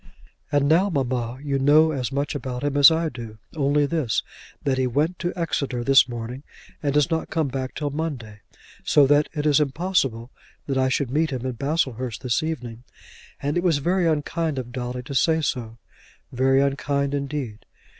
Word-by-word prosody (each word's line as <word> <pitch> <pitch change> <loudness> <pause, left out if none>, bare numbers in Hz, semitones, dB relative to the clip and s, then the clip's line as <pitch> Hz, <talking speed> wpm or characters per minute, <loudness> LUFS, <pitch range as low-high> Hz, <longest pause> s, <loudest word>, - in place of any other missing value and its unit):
"And 145 -1 +2
now, 175 +6 +4
mamma, 125 -6 -2
you 140 -2 -1
know 150 +4 +5
as 135 -3 -3
much 140 +1 -1
about 130 -2 -5
him 145 -1 -1
as 145 +1 +9
I 165 0 0
do; 115 -6 -8 0.2
only 145 0 +2
this, 145 -7 0 0.4
that 135 -2 0
he 130 - +2
went 150 +8 0
to 175 0 -1
Exeter 140 -8 -2
this 135 0 +5
morning, 120 +2 -6 0.4
and 145 - 0
does 150 +3 +2
not 160 -1 -1
come 160 -4 0
back 130 0 -4
till 145 -2 -2
Monday, 135 -9 -5 0.4
so 145 - +5
that 145 +2 +3
it 150 0 -2
is 150 -1 +4
impossible 140 -6 0 0.3
that 135 - -2
I 130 0 +2
should 130 -1 -1
meet 155 +3 +1
him 130 -2 -4
in 130 - -1
Baslehurst 130 - -2
this 125 -3 +1
evening; 125 -8 -5 0.6
and 145 +4 0
it 175 - 0
was 170 -5 +3
very 175 +4 +1
unkind 160 0 -1
of 125 -2 -5
Dolly 125 0 -4
to 140 +2 -7
say 160 +4 +3
so; 115 -6 -3 0.5
very 135 +2 +3
unkind 140 0 0
indeed." 140 -6 -4
140 Hz, 185 wpm, -24 LUFS, 125-155 Hz, 0.6 s, as